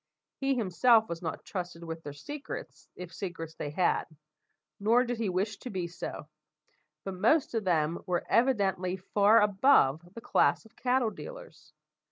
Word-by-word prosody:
He 270 0 +1
himself 225 +1 +4
was 170 -1 -5
not 160 -3 -5
trusted 175 -3 -5
with 165 0 -6
their 145 - -7
secrets, 290 - -8
if 180 -2 -9
secrets 170 -4 -6
they 145 - -5
had; 175 +4 +1 0.7
nor 230 +5 +4
did 245 -2 -3
he 220 -4 0
wish 195 +3 -2
to 255 - -7
be 185 -5 -3
so; 170 - -7 0.8
but 195 - -4
most 230 - +2
of 225 -3 -1
them 165 -2 +1
were 180 -1 -1
evidently 195 -7 +1
far 205 +4 +4
above 195 - +4
the - - -6
class 225 - +2
of 220 - -20
cattle 250 -3 +1
dealers. 150 -2 -11
190 Hz, 160 wpm, -29 LUFS, 170-230 Hz, 0.8 s, himself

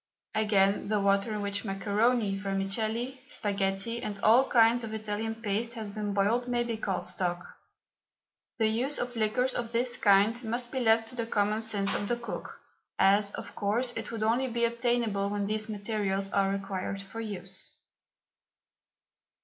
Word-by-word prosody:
Again, 205 -2 +2
the 210 0 +1
water 200 +2 +2
in 210 -1 -2
which 200 0 -1
macaroni, 210 +1 +1
vermicelli, 215 +6 -2
sparghetti, 200 +3 -1
and 205 -1 -5
all 240 +5 +5
kinds 235 0 +5
of 220 -1 -4
Italian 220 +1 -3
paste 225 +2 -2
has 215 -3 -5
been 210 0 -3
boiled, 225 +5 +2
may 240 -1 +1
be 235 -1 -3
called 195 -4 -2
stock. 180 -1 -2 1.1
The 225 - +2
use 240 +7 +1
of 245 0 -3
liquors 230 +4 +1
of 235 -1 -3
this 240 +1 +1
kind 205 +4 +4
must 240 +2 -3
be 260 - -1
left 225 -1 +3
to 255 - -10
the 230 -2 -3
common 210 0 +1
sense 205 -3 0
of 205 - -2
the 240 - +1
cook, 235 0 -7 0.4
as, 200 +1 +4
of - - -8
course, 235 +5 0
it - - -4
would 225 -2 -3
only 235 +4 +2
be 235 -1 +1
obtainable 235 -4 0
when 205 0 -1
these 215 +1 -2
materials 200 -2 -1
are 195 -1 +2
required 195 0 -3
for 225 +3 -7
use. 195 -3 -3
215 Hz, 165 wpm, -29 LUFS, 200-235 Hz, 1.1 s, all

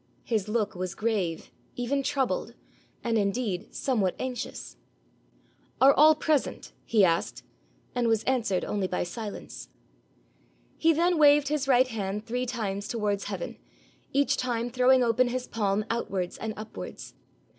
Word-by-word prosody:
His 215 -4 -1
look 215 -1 0
was 185 0 -4
grave, 205 -7 -2 0.2
even 255 +3 -1
troubled, 270 -1 -1 0.5
and 230 -2 +1
indeed 200 -2 -2
somewhat 215 -9 0
anxious. 255 -1 -5 1.0
'Are 275 +1 +7
all 310 +2 +7
present?' 305 -1 -1
he 215 -4 +4
asked, 165 -1 0 0.5
and 245 -1 +1
was 225 -1 +2
answered 235 -8 0
only 200 -2 -1
by 180 - -1
silence. 205 +4 -7 1.1
He 330 - +3
then 340 +1 +2
waved 290 -1 +6
his 295 -2 -1
right 255 -1 +5
hand 210 -3 -4
three 250 +2 -2
times 205 -5 -3
towards 210 -4 -1
heaven, 195 -4 -5 0.5
each 280 +1 +2
time 240 -1 -2
throwing 255 +1 +4
open 240 +2 +3
his 250 +1 -2
palm 210 -1 0
outwards 195 -6 -2
and 220 -1 -4
upwards. 215 +1 -8
230 Hz, 135 wpm, -27 LUFS, 205-255 Hz, 1.1 s, Are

